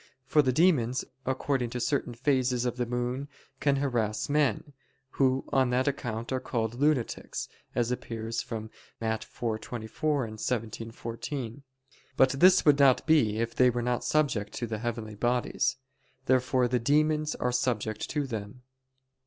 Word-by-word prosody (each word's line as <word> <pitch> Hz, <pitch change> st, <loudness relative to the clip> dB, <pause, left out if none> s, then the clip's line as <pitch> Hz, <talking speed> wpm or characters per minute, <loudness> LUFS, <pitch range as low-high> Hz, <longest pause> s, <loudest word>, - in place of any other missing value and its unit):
For 150 Hz, +2 st, +4 dB
the 130 Hz, -3 st, +2 dB
demons, 130 Hz, -5 st, +2 dB, 0.2 s
according 130 Hz, -1 st, 0 dB
to 125 Hz, -, -4 dB
certain 125 Hz, -1 st, -1 dB
phases 125 Hz, -1 st, +1 dB
of 125 Hz, 0 st, -2 dB
the 125 Hz, -1 st, -1 dB
moon, 125 Hz, +3 st, -2 dB, 0.3 s
can 140 Hz, -1 st, +2 dB
harass 120 Hz, -6 st, -1 dB
men, 145 Hz, -1 st, +1 dB, 0.4 s
who 130 Hz, -1 st, +1 dB
on 130 Hz, -2 st, +3 dB
that 125 Hz, +2 st, +1 dB
account 120 Hz, -4 st, -3 dB
are 130 Hz, -, 0 dB
called 115 Hz, -3 st, -2 dB
lunatics, 140 Hz, -1 st, -1 dB, 0.3 s
as 120 Hz, 0 st, +1 dB
appears 115 Hz, -2 st, -3 dB
from 110 Hz, -1 st, -6 dB, 0.3 s
Matt. 110 Hz, -1 st, -1 dB
4:24 120 Hz, +5 st, -2 dB
and 110 Hz, 0 st, -9 dB
17:14. 115 Hz, +3 st, -4 dB, 0.6 s
But 130 Hz, -1 st, +5 dB
this 185 Hz, +7 st, +5 dB
would 145 Hz, -2 st, +5 dB
not 135 Hz, -3 st, +5 dB
be 140 Hz, -10 st, +3 dB
if 115 Hz, +1 st, -1 dB
they 125 Hz, 0 st, +5 dB
were 120 Hz, 0 st, -1 dB
not 125 Hz, 0 st, 0 dB
subject 120 Hz, -9 st, 0 dB
to 120 Hz, -, -3 dB
the 110 Hz, -2 st, -4 dB
heavenly 115 Hz, -2 st, -4 dB
bodies. 120 Hz, +3 st, 0 dB, 0.5 s
Therefore 130 Hz, -1 st, +3 dB
the 125 Hz, 0 st, +1 dB
demons 150 Hz, +4 st, +2 dB
are 125 Hz, -, -1 dB
subject 115 Hz, -4 st, -1 dB
to 150 Hz, -2 st, -1 dB
them. 110 Hz, 0 st, -6 dB
125 Hz, 150 wpm, -29 LUFS, 115-135 Hz, 0.6 s, But